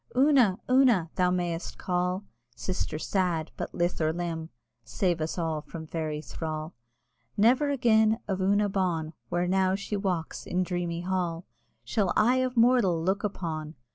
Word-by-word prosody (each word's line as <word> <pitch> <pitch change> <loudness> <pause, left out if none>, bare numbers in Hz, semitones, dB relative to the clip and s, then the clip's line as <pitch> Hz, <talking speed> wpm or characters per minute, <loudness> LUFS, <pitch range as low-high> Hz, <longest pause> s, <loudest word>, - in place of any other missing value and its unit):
"Una! 260 -8 +5
Una!" 245 -11 +4
thou 180 -1 +2
may'st 175 -2 -2
call, 180 +1 -1 0.3
Sister 155 +6 -3
sad! 170 -1 -1
but - - -5
lith 175 0 0
or 155 0 +2
limb 165 -1 -4 0.3
(Save 175 -4 -1
us 155 +3 -2
all 160 -3 -1
from 160 +1 -8
Fairy 155 -1 -3
thrall!) 155 0 -5 0.6
Never 250 +7 +4
again 220 -5 +3
of 190 -2 -1
Una 205 +2 +3
bawn, 175 -5 -1 0.2
Where 175 0 0
now 190 0 +2
she 200 +1 -4
walks 185 -5 -3
in 185 +1 0
dreamy 175 -1 -2
hall, 175 -2 -2 0.4
Shall 200 -5 0
eye 245 +4 +4
of 255 -1 -1
mortal 230 -8 +4
look 190 +4 0
upon! 160 -6 -4
180 Hz, 150 wpm, -28 LUFS, 165-205 Hz, 0.6 s, Una